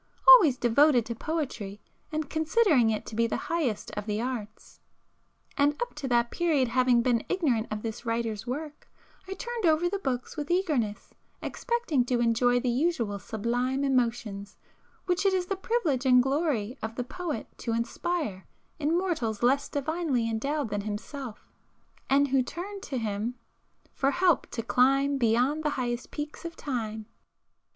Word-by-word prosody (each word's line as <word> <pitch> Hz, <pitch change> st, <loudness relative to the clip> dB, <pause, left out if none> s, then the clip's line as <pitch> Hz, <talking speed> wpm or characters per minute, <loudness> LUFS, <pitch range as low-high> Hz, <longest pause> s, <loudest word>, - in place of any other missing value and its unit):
Always 390 Hz, -, +9 dB
devoted 245 Hz, +1 st, +4 dB
to 235 Hz, -, -4 dB
poetry, 245 Hz, -9 st, -4 dB, 0.3 s
and 310 Hz, -1 st, -2 dB
considering 315 Hz, -, +3 dB
it 215 Hz, -1 st, -2 dB
to 220 Hz, -, -8 dB
be 230 Hz, +1 st, +2 dB
the -, -, -2 dB
highest 300 Hz, -11 st, -2 dB
of 210 Hz, +1 st, -5 dB
the 210 Hz, 0 st, -1 dB
arts, 230 Hz, -3 st, -6 dB, 0.8 s
and 290 Hz, +1 st, +2 dB
up 485 Hz, -, -3 dB
to 295 Hz, -2 st, -5 dB
that 240 Hz, -1 st, +2 dB
period 305 Hz, -8 st, +1 dB
having 250 Hz, -1 st, +3 dB
been 240 Hz, -2 st, +2 dB
ignorant 265 Hz, -, +1 dB
of 215 Hz, 0 st, -4 dB
this 225 Hz, 0 st, -5 dB
writer's 230 Hz, -1 st, -2 dB
work, 295 Hz, +4 st, -6 dB, 0.4 s
I 385 Hz, -, -4 dB
turned 475 Hz, -2 st, -2 dB
over 320 Hz, +2 st, +3 dB
the 395 Hz, +3 st, -2 dB
books 255 Hz, -7 st, -3 dB
with 295 Hz, -1 st, -4 dB
eagerness, 300 Hz, -, 0 dB, 0.3 s
expecting 470 Hz, -, 0 dB
to 245 Hz, -1 st, 0 dB
enjoy 240 Hz, +1 st, +3 dB
the 245 Hz, -, -1 dB
usual 240 Hz, -7 st, 0 dB
sublime 245 Hz, +7 st, -1 dB
emotions 230 Hz, -6 st, -1 dB, 0.5 s
which 360 Hz, 0 st, +1 dB
it 390 Hz, -1 st, +3 dB
is 365 Hz, -1 st, 0 dB
the 390 Hz, -, -2 dB
privilege 350 Hz, -, 0 dB
and 250 Hz, -1 st, +6 dB
glory 270 Hz, -4 st, -1 dB
of 220 Hz, +1 st, -4 dB
the 245 Hz, -, -2 dB
poet 320 Hz, -2 st, -4 dB
to 230 Hz, -, -2 dB
inspire 230 Hz, -, -2 dB, 0.3 s
in 310 Hz, +3 st, +1 dB
mortals 250 Hz, -, -1 dB
less 270 Hz, +3 st, +3 dB
divinely 290 Hz, -4 st, -1 dB
endowed 275 Hz, +4 st, -1 dB
than 205 Hz, 0 st, -2 dB
himself, 215 Hz, +4 st, -7 dB, 0.6 s
and 280 Hz, +1 st, +4 dB
who 265 Hz, 0 st, +3 dB
turn 375 Hz, +10 st, -6 dB
to 270 Hz, -, -4 dB
him 220 Hz, +1 st, -2 dB, 0.6 s
"for 275 Hz, -, +1 dB
help 350 Hz, 0 st, +2 dB
to 230 Hz, -, -4 dB
climb 275 Hz, +4 st, +3 dB
Beyond 250 Hz, +6 st, +2 dB
the 300 Hz, -, +2 dB
highest 240 Hz, -1 st, -2 dB
peaks 295 Hz, 0 st, -6 dB
of 335 Hz, -1 st, -6 dB
time." 220 Hz, -7 st, -4 dB
260 Hz, 160 wpm, -28 LUFS, 230-315 Hz, 0.8 s, Always